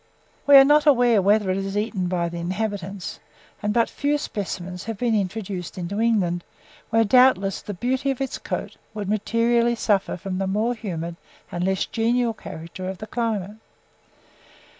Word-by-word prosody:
We 285 - +8
are 270 - +9
not 295 +2 +4
aware 245 -6 +5
whether 200 0 +3
it 185 - 0
is 195 +1 -3
eaten 205 -4 -1
by 175 -1 0
the 170 0 -5
inhabitants, 195 +1 -4 0.4
and 210 -1 0
but 230 +1 +3
few 290 +1 0
specimens 185 -7 -5
have 225 -1 -4
been 235 +1 0
introduced 195 -3 -3
into 185 +3 -3
England, 185 -7 +1 0.5
where, 225 +1 +4
doubtless, 210 -4 +4
the 205 - -6
beauty 260 +7 -1
of 270 - -1
its 270 -1 -3
coat - - -5 0.2
would 205 -2 -4
materially 230 +3 +2
suffer 205 -5 0
from 185 +1 -4
the 195 - -1
more 215 +5 +1
humid 170 -7 -5 0.3
and 175 - -2
less 190 0 +1
genial 235 +1 +1
character 185 -2 -7
of 190 - -5
the 215 - -7
climate. 215 -3 -2
205 Hz, 165 wpm, -23 LUFS, 185-235 Hz, 0.5 s, are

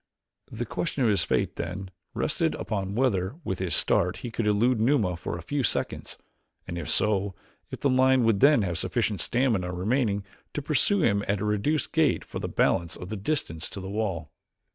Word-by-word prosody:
The 120 +2 -4
question 145 +3 -2
of 115 - +4
his 100 -4 +3
fate, - - -1
then, 90 +2 -5 0.2
rested - - 0
upon 100 -1 -3
whether, 110 -4 +1
with 95 - -3
his 95 -2 +1
start 90 +2 +2
he 120 - -4
could 115 -1 -2
elude 110 +3 +2
Numa 110 -7 +2
for 85 - -5
a 85 - -9
few 145 +10 -1
seconds; 120 - -1 0.5
and, 85 - -5
if 85 -2 -5
so, 100 +1 +2 0.3
if - - -8
the - - +3
lion 130 -1 +4
would 115 -3 +3
then 140 -3 +5
have 85 -3 -1
sufficient 110 -4 0
stamina 115 -8 +1
remaining 100 +2 0 0.3
to 150 - -1
pursue 165 +6 +2
him 100 -5 +2
at 100 0 0
a 105 - -2
reduced 105 +9 0
gait 160 -5 +2
for - - -6
the - - -4
balance 85 0 +1
of 90 - -8
the 110 - -3
distance 95 - -2
to - - -7
the 95 0 -6
wall. 95 -8 -3
105 Hz, 195 wpm, -27 LUFS, 95-125 Hz, 0.5 s, then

